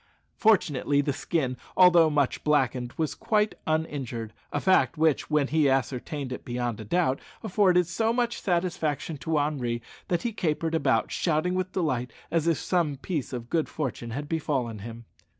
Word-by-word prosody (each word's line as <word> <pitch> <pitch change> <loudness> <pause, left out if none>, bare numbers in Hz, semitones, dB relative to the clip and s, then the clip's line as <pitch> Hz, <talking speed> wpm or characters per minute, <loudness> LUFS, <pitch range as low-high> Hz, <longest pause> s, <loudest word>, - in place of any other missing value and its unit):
Fortunately 150 - +3
the 140 0 -1
skin, 130 -3 -1 0.2
although 175 -3 +7
much 145 -3 0
blackened, 130 -5 +1
was 160 -2 0
quite 215 -1 +1
uninjured 135 -8 -2 0.2
a - - 0
fact 155 -10 +3
which, 155 -2 +2
when 150 -3 +2
he 155 -3 +3
ascertained 135 +1 -1
it 125 - -5
beyond 120 -2 -3
a - - -6
doubt, 140 - +1 0.2
afforded 180 -2 +3
so 220 +7 0
much 240 0 -1
satisfaction 170 -4 -1
to 155 +4 -1
Henri 135 -5 -1 0.3
that 175 - 0
he 235 -2 -2
capered 165 -4 -1
about 135 -7 +1
shouting 165 +1 0
with 185 0 -1
delight, 130 -9 -1 0.2
as 165 -1 +1
if 165 -3 +3
some 165 -6 0
piece 150 -1 -3
of 120 -2 -5
good 160 +4 0
fortune 130 -5 -4
had 145 +5 -4
befallen 135 -8 -2
him. 115 +2 -9
150 Hz, 165 wpm, -27 LUFS, 130-175 Hz, 0.3 s, although